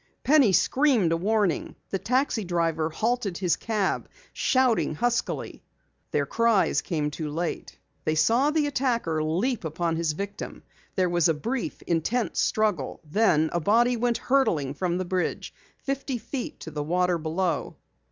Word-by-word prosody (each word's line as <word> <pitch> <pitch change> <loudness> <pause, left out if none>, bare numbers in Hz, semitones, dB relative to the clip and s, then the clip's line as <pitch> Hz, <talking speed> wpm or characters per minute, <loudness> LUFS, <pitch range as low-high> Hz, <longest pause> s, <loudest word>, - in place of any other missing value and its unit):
Penny 280 -7 +5
screamed 250 - +3
a - - +3
warning; 200 -1 0 0.2
the 195 - -1
taxi 250 -1 0
driver 165 -3 0
halted 215 0 -1
his 180 -3 +1
cab, 215 -4 -1 0.2
shouting 255 - +2
huskily. 240 +8 -2 0.5
Their - - 0
cries 230 -4 +2
came 150 -4 -2
too 155 0 -4
late. 165 +3 -4 0.3
They 155 - 0
saw 235 - +3
the 305 -1 +1
attacker 235 - 0
leap 190 +10 0
upon 165 +1 -1
his 165 -2 0
victim. 200 +5 -6 0.3
There 185 -1 +2
was 175 -1 +2
a 160 - +2
brief, 235 - -4
intense 210 +8 0
struggle, 210 -11 0
then 160 -2 +2
a 175 - +1
body 235 +8 +3
went 235 0 +1
hurtling 170 - +1
from 175 +3 -1
the 185 - -2
bridge, 180 0 -2 0.2
fifty 275 -1 -3
feet 240 +3 -6
to 160 - -7
the 150 -1 -3
water 180 +3 +1
below. 165 +1 -2
190 Hz, 150 wpm, -26 LUFS, 165-240 Hz, 0.5 s, Penny